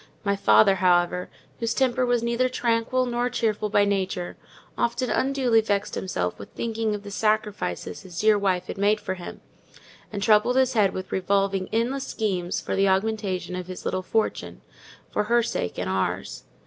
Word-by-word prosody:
My 200 -1 +1
father, 110 - +5
however, 180 -1 +2 0.3
whose 230 0 -1
temper 255 -1 +2
was 240 -1 +1
neither 235 +2 +1
tranquil 245 +1 +1
nor 245 0 -1
cheerful 215 -3 -1
by 205 -1 +4
nature, 190 -3 -2 0.4
often 240 +1 0
unduly 260 -4 +2
vexed 205 -2 -1
himself 90 - -2
with 100 - -9
thinking 225 -2 -2
of 205 - -8
the 205 - -8
sacrifices 215 0 -1
his 180 -3 -8
dear 215 0 +5
wife 190 -3 0
had - - -7
made 205 +2 +3
for 185 - -3
him; 180 -2 -9 0.7
and 200 -2 -3
troubled 215 +3 +4
his 260 -1 +3
head 205 -4 +3
with 185 0 -6
revolving 195 0 0
endless 250 +5 -1
schemes 185 -5 -2
for - - -3
the 195 0 +3
augmentation 190 -2 -1
of 180 -1 -5
his 185 -1 -8
little 185 - -1
fortune, 220 +4 -2 0.5
for 210 - 0
her 235 +2 +3
sake 90 - -3
and 90 - -2
ours. 95 0 -2
205 Hz, 175 wpm, -25 LUFS, 185-230 Hz, 0.7 s, father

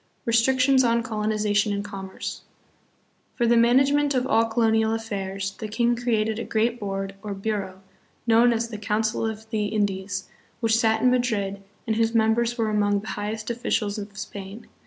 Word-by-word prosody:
Restrictions 260 +3 +4
on 235 -1 +2
Colonization 210 -1 0
and 200 0 -2
Commerce. 195 -2 -6 0.9
For 240 - +1
the 235 0 +4
management 275 +5 +4
of 250 0 +1
all 225 -2 +3
colonial 225 -1 +2
affairs 195 -3 -4
the 220 - -4
king 235 +3 +1
created 225 -2 0
a - - -3
great 230 +2 0
board, 195 -1 -3
or 205 -2 -5
bureau, 195 -2 -4 0.4
known 235 +1 +5
as 230 0 -1
the 215 -2 -6
"Council 215 +1 0
of 220 0 -6
the 215 -2 0
In 205 0 +1
dies," 190 -1 -4 0.3
which 225 -2 +2
sat 220 -1 +2
in 250 - +5
Madrid 210 -6 0 0.2
and 220 -1 0
whose 230 0 +1
members 230 +2 +2
were 220 -2 0
among 205 -1 +1
the 215 - -8
highest 215 +2 -4
officials 220 -3 -1
of 200 0 -9
Spain. 205 +2 -8
220 Hz, 170 wpm, -25 LUFS, 205-235 Hz, 0.9 s, known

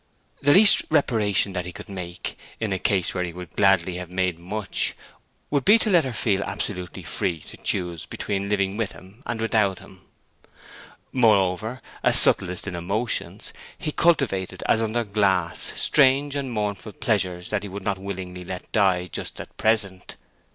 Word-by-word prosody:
The 145 - +4
least 205 +2 +7
reparation 110 - +2
that 90 -1 -3
he - - -5
could - - -11
make, 90 -3 -6 0.2
in 110 -3 -1
a 95 - -2
case 95 -2 +1
where 90 - -1
he 85 -1 -5
would 90 -1 -10
gladly 95 -3 +3
have 90 -1 -6
made 90 -2 -1
much, 100 +4 0 0.6
would 140 -2 +1
be 210 - +7
to 220 -2 0
let 170 -5 +5
her 130 - -3
feel 105 -3 0
herself - - -3
absolutely 90 -3 -5
free 85 -2 -2
to - - -12
choose 90 -3 -1
between 100 0 -3
living 100 -1 0
with 115 -3 -2
him 95 +6 -16
and 120 -1 -3
without 110 -4 +1
him. 95 -1 -15 1.1
Moreover, 110 0 +2 0.2
a - - +3
subtlist 90 -1 +5
in 100 -3 -5
emotions, 105 +7 -2 0.2
he 150 - -3
cultivated 135 - +1
as 110 - +3
under 115 +2 0
glasses 95 -5 0
strange 140 0 +4
and 140 -3 -3
mournful 105 -1 -3
pleasures 90 -5 -1
that 105 -2 0
he 100 - -7
would 100 +1 -7
not 100 -1 -1
willingly 95 -2 -6
let 90 +1 -7
die 95 -4 +2
just 90 - -7
at - - -10
present. 105 -4 0
100 Hz, 170 wpm, -24 LUFS, 90-115 Hz, 1.1 s, least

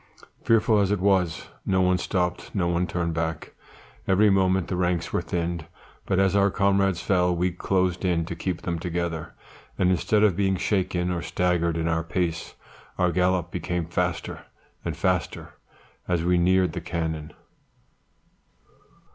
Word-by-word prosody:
"Fearful 110 -1 +3
as 100 -2 +2
it 105 -1 +1
was, 95 -4 +1 0.2
no 95 -1 +1
one 90 0 +3
stopped, 90 +1 -2
no 90 -3 +1
one 85 +1 0
turned 85 -2 -2
back. 80 0 -3 0.5
Every 100 +2 +4
moment 95 -2 +2
the 90 - -2
ranks 90 -1 -1
were - - +1
thinned, 85 -2 -3 0.4
but 95 - +1
as 95 0 +3
our 100 0 +4
comrades 100 -2 +2
fell, 90 -2 +2
we 90 +1 0
closed 90 0 0
in 85 -3 +1
to - - -5
keep 90 -2 -3
them 85 -2 -2
together; 85 -2 -3 0.4
and 90 -1 +3
instead 105 +4 +2
of 100 -5 +4
being 95 0 +1
shaken 90 -2 0
or 85 -1 -2
staggered 85 -2 0
in 80 0 -1
our 80 0 0
pace 85 -1 -2 0.4
our 90 -1 +2
gallop 90 0 +1
became 90 -1 -2
faster 85 0 -3 0.4
and - - -4
faster - - -1 0.5
as 85 -2 0
we 90 +1 +2
neared 90 -1 +3
the - - -4
cannon. 80 -2 -3
90 Hz, 155 wpm, -25 LUFS, 85-95 Hz, 0.5 s, Every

